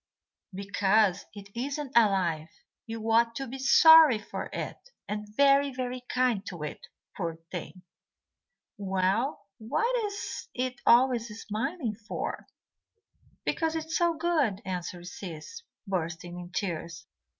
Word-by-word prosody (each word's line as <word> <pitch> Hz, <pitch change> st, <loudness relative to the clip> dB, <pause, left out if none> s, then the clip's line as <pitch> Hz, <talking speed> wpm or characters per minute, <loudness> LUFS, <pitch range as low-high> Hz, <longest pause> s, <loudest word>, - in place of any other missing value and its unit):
"Because 200 Hz, 0 st, +1 dB
it 200 Hz, -1 st, -10 dB
isn't 275 Hz, +3 st, -3 dB
alive. 185 Hz, -8 st, +3 dB, 0.4 s
You 225 Hz, 0 st, -3 dB
ought 230 Hz, 0 st, +4 dB
to 270 Hz, -, -3 dB
be 265 Hz, +1 st, -7 dB
sorry 320 Hz, -1 st, +8 dB
for 210 Hz, -, -6 dB
it, -, -, -6 dB, 0.2 s
and 210 Hz, 0 st, -4 dB
very, 280 Hz, 0 st, +5 dB
very 255 Hz, -1 st, -4 dB
kind 250 Hz, -5 st, +1 dB
to 175 Hz, -5 st, -6 dB
it, 150 Hz, -, -7 dB, 0.3 s
poor 170 Hz, -4 st, -3 dB, 0.2 s
thing." 180 Hz, +1 st, -7 dB, 1.0 s
"Well, 195 Hz, +7 st, 0 dB
what 460 Hz, -, 0 dB
is 405 Hz, 0 st, -5 dB
it 255 Hz, 0 st, -3 dB
always 240 Hz, -1 st, +5 dB
smiling 225 Hz, -, -3 dB
for?" 215 Hz, +1 st, -5 dB, 1.0 s
"Because 325 Hz, -1 st, 0 dB
it 320 Hz, -1 st, -2 dB
is 320 Hz, -, -4 dB
so 340 Hz, -1 st, +2 dB
good," 305 Hz, -, 0 dB
answered 180 Hz, -1 st, -5 dB
Sis, 180 Hz, -, -8 dB, 0.3 s
bursting 175 Hz, -1 st, -3 dB
into 175 Hz, +1 st, -3 dB
tears. 170 Hz, -3 st, -5 dB
220 Hz, 125 wpm, -28 LUFS, 185-270 Hz, 1.0 s, sorry